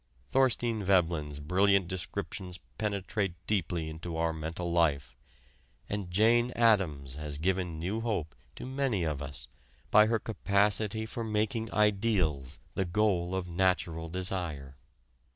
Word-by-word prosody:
Thorstein 120 -4 +2
Veblen's 85 -6 +1
brilliant 95 +4 +3
descriptions 90 0 -5 0.2
penetrate 100 -2 -1
deeply 85 -5 -1
into 80 +1 -6
our 80 0 +1
mental 80 +2 -4
life, 70 -7 +1 0.7
and 100 -3 -3
Jane 115 +6 +4
Addams 85 - +2
has 75 -1 -4
given 90 0 -1
new 95 +8 -2
hope 100 -9 -2 0.2
to - - -7
many 130 -7 0
of 75 -3 -2
us 70 -1 -7 0.4
by 105 0 +7
her 115 +1 +2
capacity 105 0 +1
for 115 +1 -4
making 110 +1 -1
ideals 100 - +1 0.2
the 95 - 0
goal 95 -1 +1
of 95 -1 -2
natural 85 -2 0
desire. 85 -7 -3
95 Hz, 125 wpm, -30 LUFS, 80-105 Hz, 0.7 s, by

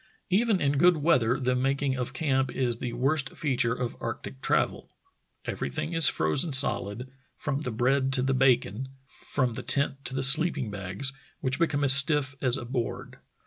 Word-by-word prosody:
Even 210 +1 +1
in 140 -2 0
good 175 +1 +4
weather 135 -6 +1
the 125 0 -1
making 135 +1 -1
of 125 -1 -4
camp 135 -2 -1
is 120 -3 0
the 120 -2 -5
worst 135 +3 -1
feature 125 -5 0
of 125 -1 -5
arctic 65 0 -7
travel. - - -1 0.6
Everything 70 - -5
is 165 -3 +7
frozen 80 - +1
solid, 125 -1 +2 0.3
from 145 -2 -4
the 125 - -4
bread 130 +4 0
to 130 -2 +2
the 135 0 0
bacon, 130 -2 0 0.2
from 130 -2 -3
the - - -6
tent 140 -1 0
to 130 - -3
the 135 - 0
sleeping 140 -4 +3
bags, 100 +7 -4 0.3
which 130 -1 -2
become 155 -4 0
as 135 -2 +7
stiff 140 0 +4
as 125 -2 +4
a 120 - -7
board. 120 -1 -5
135 Hz, 175 wpm, -26 LUFS, 125-140 Hz, 0.6 s, is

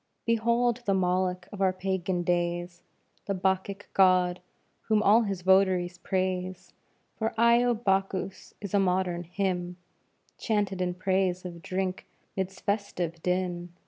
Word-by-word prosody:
_ - - -50
Behold 235 +1 +2
the 195 - +3
Moloch 180 0 0
of 205 - -7
our 190 -1 +4
Pagan 185 -1 -2
days, 175 0 -1 0.5
The 200 - 0
Bacchic 190 +2 -1
God, 185 -1 +4 0.5
whom 215 -1 +3
all 215 +4 +6
his 195 -5 -3
votaries 185 -2 +3
praise; 185 -1 -2 0.5
For 220 0 -1
"Io 235 +1 +5
Bacchus" 195 -3 -2
is 200 -2 -6
a 200 - +4
modern 180 -2 +1
hymn, 180 0 -2 0.6
Chanted 205 -4 0
in 180 -1 -1
praise 185 -1 0
of 170 -2 -7
drink 185 +1 -3 0.3
'midst 190 -1 -4
festive 180 -5 -2
din. 180 -1 -2
185 Hz, 135 wpm, -28 LUFS, 180-195 Hz, 0.6 s, all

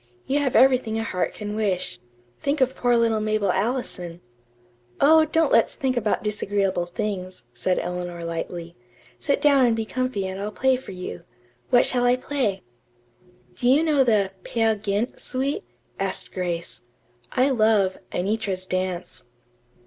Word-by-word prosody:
You 280 +2 +1
have 275 -3 0
everything 255 -4 +4
a 225 - -1
heart 185 -5 -2
can 210 0 -5
wish. 195 - -1 0.4
Think 285 +1 -1
of 260 0 +2
poor 245 -1 +2
little 230 -1 +2
Mabel 215 -3 +1
Allison." 190 -5 -2 0.8
"Oh, 315 +2 +6
don't 320 -1 +2
let's 230 - +4
think 260 -2 -1
about 220 -3 0
disagreeable 200 -4 0
things," 185 -1 -4
said 180 +9 0
Eleanor 175 -1 -4
lightly. 170 0 -5 0.4
"Sit 280 - +1
down 280 -3 +5
and 230 - +2
be 225 -1 -2
comfy 255 -4 -2
and 190 +1 -4
I'll 210 +1 -3
play 265 +3 +2
for 255 -5 -8
you. 180 -1 -7 0.5
What 245 - +5
shall 245 -1 +2
I 245 0 +5
play?" 255 -6 -2 0.9
"Do 245 - 0
you 285 +5 +5
know 300 -4 +4
the 210 -6 +2
'Peer 225 +2 +1
Gynt' 205 +3 -2
suite?" 270 +2 -2 0.4
asked 195 -1 -2
Grace. 170 -10 -3 0.5
"I 260 +2 +3
love 215 -5 +3
'Anitra's 195 -1 -1
Dance.'" 185 -4 -3
215 Hz, 150 wpm, -24 LUFS, 185-255 Hz, 0.9 s, Oh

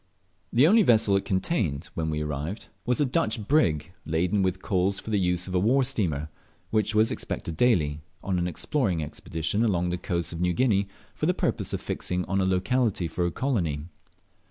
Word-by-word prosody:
The 125 +5 +5
only 215 +7 +6
vessel 110 - +4
it 100 - 0
contained 95 - -1
when 80 -1 -2
we 75 0 -1
arrived 75 +7 -4 0.2
was 125 +2 +2
a 145 - +4
Dutch 110 -4 -1
brig, 85 - +2
laden 90 +5 +1
with 95 -1 0
coals 95 +1 +1
for 110 - -7
the 105 - +2
use 90 -1 0
of 95 - -5
a 90 - +3
war 125 +8 +3
steamer, 85 - 0 0.4
which 110 -1 +1
was 110 +1 +4
expected 85 - -4
daily, 80 -9 +2 0.2
on 90 -1 0
an 90 - 0
exploring 90 - -1
expedition 80 +6 -2
along 90 -6 +1
the 90 0 -2
coasts 85 -2 -2
of 85 - -5
New 90 0 +2
Guinea, 100 -2 +2 0.3
for - - -2
the - - +2
purpose - - -1
of - - -2
fixing 90 0 -2
on 95 +1 0
a - - +1
locality 95 0 +1
for 85 +2 -1
a - - -2
colony. 85 - -1
95 Hz, 195 wpm, -26 LUFS, 85-110 Hz, 0.4 s, only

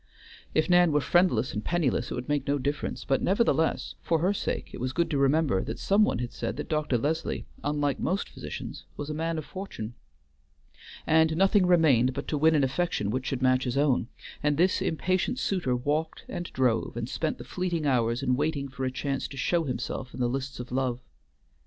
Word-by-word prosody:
If 155 - +3
Nan 175 -2 +5
were 150 - +3
friendless 150 -8 +2
and 105 - -3
penniless 145 -7 0
it - - -3
would 125 0 -5
make 145 -2 0
no 145 +1 +2
difference; 145 +2 -3
but 135 -1 +1
nevertheless, 190 -5 +1
for 165 - +1
her 180 +5 +2
sake, - - -3
it - - -7
was 130 +1 -2
good 170 +2 0
to 145 - +1
remember 140 -6 +3
that - - -5
some 200 +2 +3
one - - +1
had 120 0 -4
said 115 - -4
that - - -5
Dr. 150 -5 +1
Leslie, 155 +7 -2 0.2
unlike 145 -1 0
most 190 +4 -1
physicians, - - -7
was 145 +1 -4
a - - -2
man 165 +1 -2
of 155 - -4
fortune. 185 - -6 1.1
And 160 0 +3
nothing 195 0 +4
remained 135 -8 +4
but 140 - -4
to 150 - 0
win 160 +2 +5
an 145 - +3
affection 135 - 0
which 130 +2 -2
should 130 -1 -2
match 130 0 +3
his 125 +1 -1
own, 140 -5 +2 0.3
and 150 0 +1
this 185 +3 +3
impatient 185 +6 0
suitor 175 - 0
walked 150 +6 -2
and 175 - -5
drove 125 -3 0
and 120 -1 -2
spent 155 +4 -2
the - - -8
fleeting 175 -4 -2
hours 120 -2 +1
in 125 -1 +2
waiting 145 0 -1
for 135 0 -4
a 130 - -1
chance 135 +1 -2
to 140 - -10
show 165 +5 +1
himself 125 -1 -4
in - - -8
the 125 - +2
lists 135 +2 -3
of 125 0 -7
love. 125 -1 0
145 Hz, 210 wpm, -28 LUFS, 130-165 Hz, 1.1 s, Nan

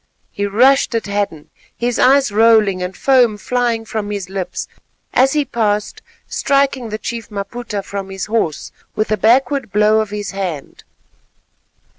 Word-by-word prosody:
he 205 0 -2
rushed 255 +5 +3
at 230 - -1
Hadden, 200 -7 -3 0.3
his 240 0 -1
eyes 270 -2 +4
rolling 215 -3 +4
and 180 +1 -5
foam 250 -6 +3
flying 240 0 -1
from 215 -2 -4
his 200 -3 -5
lips, 195 -2 -4 0.5
as 265 +2 +4
he 300 -1 +1
passed 210 -4 -1 0.3
striking 275 -4 0
the 215 - -3
chief 230 +1 -6
Maputa 205 0 -5
from 195 0 -6
his 195 -1 -4
horse 210 -9 -2 0.2
with 215 0 -1
a - - +4
backward 250 +2 +2
blow 210 +2 +3
of 215 - -4
his 205 -1 -5
hand. 180 -8 -5
215 Hz, 150 wpm, -17 LUFS, 200-245 Hz, 0.5 s, eyes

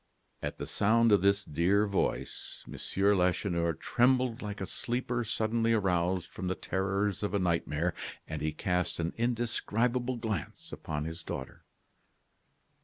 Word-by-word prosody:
At - - -4
the - - -4
sound 115 +2 +3
of 100 - +6
this 100 +1 +3
dear 90 +7 +2
voice, 100 -2 -2
M. - - -8 0.4
Lacheneur 90 -2 +1
trembled 125 - +2
like 105 -1 -5
a 95 - -2
sleeper 120 +3 -2
suddenly 115 +1 +1
aroused 90 -3 +1
from 95 - -4
the 95 - 0
terrors 100 +1 -1
of 105 -1 -1
a - - +4
nightmare, 85 -2 0 0.3
and 80 -1 -4
he 75 0 0
cast 90 +3 -1
an 85 +1 -1
indescribable 120 +1 0
glance 110 -8 -4
upon 75 -1 -4
his 80 +1 -5
daughter. 65 -4 -7
100 Hz, 140 wpm, -31 LUFS, 85-115 Hz, 0.4 s, of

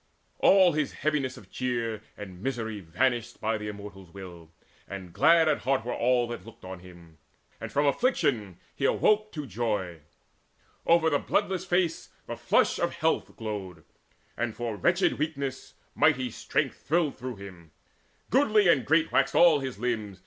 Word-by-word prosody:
All 190 -2 +6
his 155 -2 -1
heaviness 145 -4 -1
of - - -15
cheer 115 -4 -2 0.2
And 95 -3 -9
misery 110 -4 -3
vanished 115 +7 -1
by 110 0 -1
the 105 - -5
Immortals' 100 -3 -9
will; 85 -4 -11 0.4
And 95 -3 -8
glad 165 +3 +5
at 150 - +2
heart 130 -2 0
were 120 - -2
all 120 0 +2
that 120 -6 -6
looked 115 -3 -14
on 95 0 -7
him; 85 -3 -16 0.4
And - - -6
from 145 +1 +1
affliction 140 - +1 0.2
he - - -2
awoke 215 0 +2
to 150 -2 -5
joy. 105 -7 -2 0.9
Over 165 -1 +4
the 145 - +2
bloodless 185 -1 -1
face 175 -2 0 0.2
the - - -5
flush - - +2
of - - -1
health - - 0
Glowed, 95 -7 -6 0.5
and 120 -2 -2
for 120 -2 -3
wretched 100 - +1
weakness 140 -4 -4 0.2
mighty 125 -2 +2
strength - - -2
Thrilled 160 -1 +1
through 125 -1 -5
him: 95 -5 -12 0.6
goodly 215 -7 +4
and 140 -7 +3
great 160 +1 +3
waxed 135 0 +2
all 170 -4 +6
his 130 -6 -5
limbs. 110 -4 -3
120 Hz, 160 wpm, -28 LUFS, 100-150 Hz, 0.9 s, All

